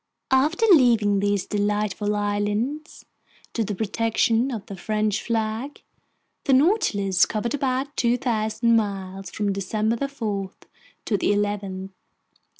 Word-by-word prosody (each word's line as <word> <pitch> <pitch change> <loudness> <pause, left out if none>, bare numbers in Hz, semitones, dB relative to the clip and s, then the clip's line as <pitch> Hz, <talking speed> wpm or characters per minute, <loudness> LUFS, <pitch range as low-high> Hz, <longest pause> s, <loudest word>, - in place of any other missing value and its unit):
After 300 +11 +3
leaving 230 - +5
these 205 -1 0
delightful 210 0 -1
islands 205 +8 -2 0.5
to 230 - 0
the 205 -1 -3
protection 225 +3 +1
of 220 -5 -5
the 200 - -8
French 215 +2 -1
flag, 225 +4 -3 0.6
the 275 - +3
Nautilus 225 - +3
covered 225 +2 -2
about 275 0 -1
2,000 230 -1 +1
miles 195 -3 -2
from 205 -2 -1
December 220 +6 -1
4 210 -8 -3 0.6
to 210 - +1
the - - +1
11th. 200 -2 -1
215 Hz, 115 wpm, -24 LUFS, 205-240 Hz, 0.6 s, leaving